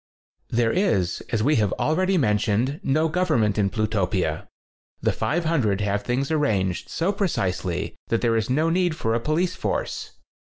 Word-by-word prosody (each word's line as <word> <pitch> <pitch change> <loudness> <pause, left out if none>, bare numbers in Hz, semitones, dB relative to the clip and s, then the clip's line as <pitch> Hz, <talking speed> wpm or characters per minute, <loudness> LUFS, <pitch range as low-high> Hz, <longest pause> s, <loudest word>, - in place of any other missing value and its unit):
There 115 -1 +2
is, 100 - +1
as 110 -2 0
we 150 +5 +3
have 105 -3 +1
already 185 +5 +1
men 105 -9 +2
tioned;, 120 +8 0
no 155 +4 +2
government 155 - +1
in 100 -1 +2
Plutopia. 100 -3 -1 0.5
The - - +1
500 155 - 0
have 100 0 0
things 130 +7 -1
arranged 100 - 0
so 170 +4 0
pre 200 -1 0
cisely 95 - -2
that 115 - 0
there 115 -2 +2
is 110 0 0
no 155 +6 +2
need 175 -2 +1
for 115 -6 -1
a 115 - +1
police 165 +8 0
force. - - -3
120 Hz, 165 wpm, -24 LUFS, 105-160 Hz, 0.5 s, we